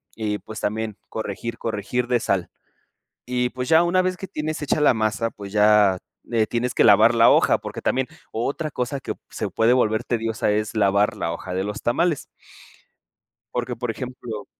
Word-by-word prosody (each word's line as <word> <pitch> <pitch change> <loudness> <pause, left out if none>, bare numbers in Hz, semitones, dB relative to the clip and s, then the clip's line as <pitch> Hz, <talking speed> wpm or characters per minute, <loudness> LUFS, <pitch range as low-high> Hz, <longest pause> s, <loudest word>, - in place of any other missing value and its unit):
y, 105 -2 -2
pues, 110 -1 -9
también 110 0 -2
corregir, 110 +2 -5
corregir 115 +3 -2
de 125 -1 +2
sal. 95 -5 -1 0.8
Y, 125 0 0
pues, 125 0 -5
ya 160 +1 +6
una 180 +2 +2
vez 185 0 -1
que 190 +1 -8
tienes 155 0 -4
hecha 150 - 0
la 150 - +5
masa, 110 0 0
pues, 100 -2 -10
ya, 105 -2 +5 0.3
eh, 115 -2 +2
tienes 120 +2 -2
que - - +4
lavar 110 +2 +6
la 115 0 +7
hoja, - - +4
porque - - -7
también 130 0 +1 0.2
otra 140 +7 -2
cosa 135 +1 -3
que - - -4
se - - -4
puede 115 +2 +3
volver 110 -2 +2
tediosa 115 -3 -1
es 105 +1 -2
lavar 100 0 +2
la 85 - -2
hoja 85 +2 -6
de 95 +1 -1
los 105 +1 -5
tamales. 160 +6 +1 1.3
Porque, 125 0 -2
por 120 +1 -3
ejemplo 120 -3 -6
115 Hz, 180 wpm, -23 LUFS, 105-125 Hz, 1.3 s, la